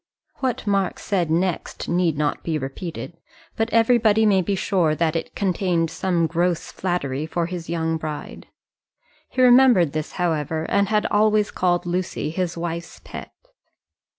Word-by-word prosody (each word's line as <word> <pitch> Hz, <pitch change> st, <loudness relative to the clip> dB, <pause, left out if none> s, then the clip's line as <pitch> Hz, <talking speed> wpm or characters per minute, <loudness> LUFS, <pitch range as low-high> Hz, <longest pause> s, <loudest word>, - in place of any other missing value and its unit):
What 255 Hz, -5 st, -2 dB
Mark 200 Hz, -2 st, 0 dB
said 180 Hz, -6 st, -1 dB
next 175 Hz, +2 st, -1 dB
need 175 Hz, -3 st, +1 dB
not 150 Hz, -1 st, -1 dB
be 160 Hz, -2 st, -1 dB
repeated, 160 Hz, +4 st, -6 dB, 0.4 s
but 225 Hz, +1 st, 0 dB
everybody 225 Hz, -1 st, +4 dB
may 195 Hz, -3 st, +4 dB
be 195 Hz, +3 st, -1 dB
sure 180 Hz, -5 st, +1 dB
that 165 Hz, 0 st, 0 dB
it 165 Hz, -, -4 dB
contained 180 Hz, -4 st, 0 dB
some 175 Hz, -2 st, 0 dB
gross 170 Hz, +1 st, -1 dB
flattery 155 Hz, -6 st, -2 dB
for 170 Hz, +1 st, -1 dB
his 175 Hz, -1 st, -6 dB
young 165 Hz, -1 st, -1 dB
bride. 155 Hz, -1 st, -7 dB, 0.8 s
He 255 Hz, -, +1 dB
remembered 245 Hz, -, +6 dB
this, 155 Hz, 0 st, -4 dB
however, 160 Hz, -2 st, -1 dB
and 200 Hz, -1 st, +2 dB
had 215 Hz, -1 st, +2 dB
always 215 Hz, 0 st, +3 dB
called 175 Hz, -1 st, +1 dB
Lucy 175 Hz, -3 st, -2 dB
his 175 Hz, 0 st, -2 dB
wife's 170 Hz, 0 st, -5 dB
pet. -, -, -9 dB
175 Hz, 150 wpm, -23 LUFS, 165-200 Hz, 0.8 s, remembered